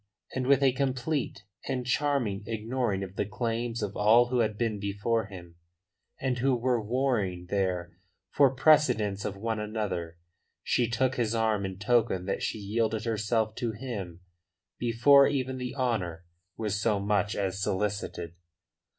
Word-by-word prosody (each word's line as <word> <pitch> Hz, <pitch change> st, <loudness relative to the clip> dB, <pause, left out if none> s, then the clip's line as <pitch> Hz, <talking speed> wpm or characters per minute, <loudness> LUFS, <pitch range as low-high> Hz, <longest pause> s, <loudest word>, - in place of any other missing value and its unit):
And 130 Hz, -1 st, -2 dB
with 140 Hz, 0 st, +4 dB
a 135 Hz, -, +5 dB
complete 130 Hz, -3 st, -2 dB, 0.2 s
and 130 Hz, -2 st, -2 dB
charming 125 Hz, -6 st, 0 dB
ignoring 115 Hz, -2 st, -1 dB
of 95 Hz, +1 st, -9 dB
the -, -, 0 dB
claims 115 Hz, +1 st, -2 dB
of 100 Hz, -1 st, -4 dB
all 115 Hz, +4 st, +5 dB
who 125 Hz, -1 st, +1 dB
had 110 Hz, -2 st, +1 dB
been 110 Hz, -3 st, -1 dB
before 105 Hz, +3 st, -1 dB
him, 85 Hz, -4 st, -11 dB, 0.6 s
and 130 Hz, -2 st, -1 dB
who 130 Hz, +1 st, +2 dB
were 120 Hz, -1 st, +1 dB
warring 105 Hz, -7 st, 0 dB
there 90 Hz, -3 st, -1 dB, 0.4 s
for 140 Hz, -2 st, +5 dB
precedence 125 Hz, -8 st, +3 dB
of 100 Hz, -, -3 dB
one 110 Hz, +1 st, -2 dB
another, 105 Hz, -6 st, -3 dB, 0.5 s
she 120 Hz, -2 st, +1 dB
took 125 Hz, +2 st, 0 dB
his 115 Hz, -2 st, 0 dB
arm 110 Hz, -3 st, +1 dB
in 95 Hz, -1 st, -7 dB
token 105 Hz, -4 st, +1 dB
that 95 Hz, -, -2 dB
she -, -, -2 dB
yielded 110 Hz, +2 st, -1 dB
herself 110 Hz, 0 st, 0 dB
to 115 Hz, -2 st, -2 dB
him 100 Hz, -7 st, -6 dB, 0.6 s
before 130 Hz, +4 st, +6 dB
even 130 Hz, -2 st, -2 dB
the 125 Hz, 0 st, -4 dB
honour 95 Hz, -11 st, -1 dB, 0.3 s
was 105 Hz, -2 st, -2 dB
so 105 Hz, -2 st, +2 dB
much 100 Hz, 0 st, 0 dB
as 95 Hz, -1 st, -2 dB
solicited. 100 Hz, -4 st, -2 dB
110 Hz, 150 wpm, -28 LUFS, 100-125 Hz, 0.6 s, before